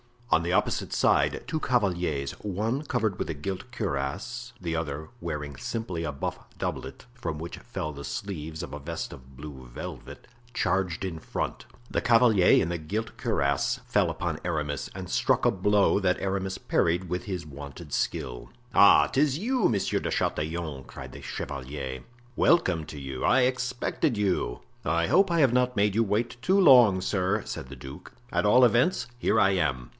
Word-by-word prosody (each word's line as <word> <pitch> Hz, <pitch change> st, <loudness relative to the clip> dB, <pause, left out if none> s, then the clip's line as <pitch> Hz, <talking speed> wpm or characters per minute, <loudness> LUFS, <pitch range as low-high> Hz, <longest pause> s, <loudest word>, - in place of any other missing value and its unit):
On 80 Hz, 0 st, +4 dB
the 85 Hz, +1 st, -1 dB
opposite -, -, 0 dB
side -, -, +2 dB
two 160 Hz, 0 st, -2 dB
cavaliers, 90 Hz, -, 0 dB
one 110 Hz, +8 st, -1 dB
covered 115 Hz, -9 st, -1 dB
with -, -, -2 dB
a -, -, -1 dB
gilt 95 Hz, -, -5 dB
cuirass, 105 Hz, -, -3 dB
the 85 Hz, -2 st, -2 dB
other 75 Hz, -1 st, -4 dB
wearing 75 Hz, -, -5 dB
simply 90 Hz, -, -3 dB
a 75 Hz, -, -2 dB
buff 70 Hz, -, -3 dB, 0.2 s
doublet, 65 Hz, 0 st, -5 dB
from 120 Hz, -11 st, -4 dB
which 85 Hz, +2 st, -6 dB
fell 95 Hz, -10 st, -5 dB
the 70 Hz, -1 st, -8 dB
sleeves 80 Hz, +2 st, -5 dB
of 85 Hz, -, -7 dB
a 75 Hz, -, -5 dB
vest 80 Hz, +3 st, -5 dB
of 65 Hz, +1 st, -13 dB
blue 65 Hz, -2 st, -9 dB
velvet, -, -, -8 dB, 0.3 s
charged 95 Hz, -2 st, 0 dB
in 85 Hz, -4 st, -4 dB
front. -, -, -4 dB, 0.3 s
The -, -, 0 dB
cavalier 115 Hz, -5 st, +5 dB
in 85 Hz, -, -2 dB
the 85 Hz, -, -1 dB
gilt 105 Hz, +8 st, -4 dB
cuirass 70 Hz, 0 st, 0 dB
fell -, -, +2 dB
upon -, -, -3 dB
Aramis 75 Hz, -4 st, -2 dB
and 95 Hz, -1 st, -6 dB
struck -, -, +2 dB
a -, -, +5 dB
blow 100 Hz, +1 st, +3 dB
that 90 Hz, -2 st, +1 dB
Aramis 95 Hz, -1 st, -2 dB
parried 85 Hz, +2 st, 0 dB
with 90 Hz, +1 st, -2 dB
his 90 Hz, -5 st, -4 dB
wonted 70 Hz, -1 st, -9 dB
skill. -, -, -2 dB, 0.2 s
"Ah! 100 Hz, -, +7 dB
'tis 140 Hz, 0 st, +2 dB
you, 240 Hz, +3 st, +2 dB
Monsieur 105 Hz, -4 st, 0 dB
de -, -, -3 dB
Chatillon," 75 Hz, -4 st, -2 dB
cried -, -, -9 dB
the -, -, -10 dB
chevalier; 65 Hz, -2 st, -5 dB, 0.3 s
"welcome 90 Hz, -, +3 dB
to 75 Hz, -, -9 dB
you—I 70 Hz, -, +1 dB
expected 125 Hz, 0 st, 0 dB
you." 95 Hz, -11 st, 0 dB, 0.2 s
"I 85 Hz, +2 st, +1 dB
hope 195 Hz, +1 st, +4 dB
I 170 Hz, -2 st, +3 dB
have 130 Hz, -4 st, +4 dB
not 125 Hz, 0 st, +2 dB
made 105 Hz, -1 st, +2 dB
you 115 Hz, +2 st, +3 dB
wait 115 Hz, +4 st, -1 dB
too 190 Hz, +9 st, +3 dB
long, 125 Hz, -, +7 dB
sir," 100 Hz, +2 st, 0 dB
said -, -, -6 dB
the 70 Hz, -, -9 dB
duke; 65 Hz, +1 st, -10 dB, 0.2 s
"at -, -, +1 dB
all 125 Hz, +5 st, +6 dB
events, 125 Hz, -, +3 dB
here -, -, +2 dB
I 100 Hz, -1 st, +5 dB
am." 75 Hz, -10 st, 0 dB
90 Hz, 175 wpm, -27 LUFS, 75-115 Hz, 0.3 s, Ah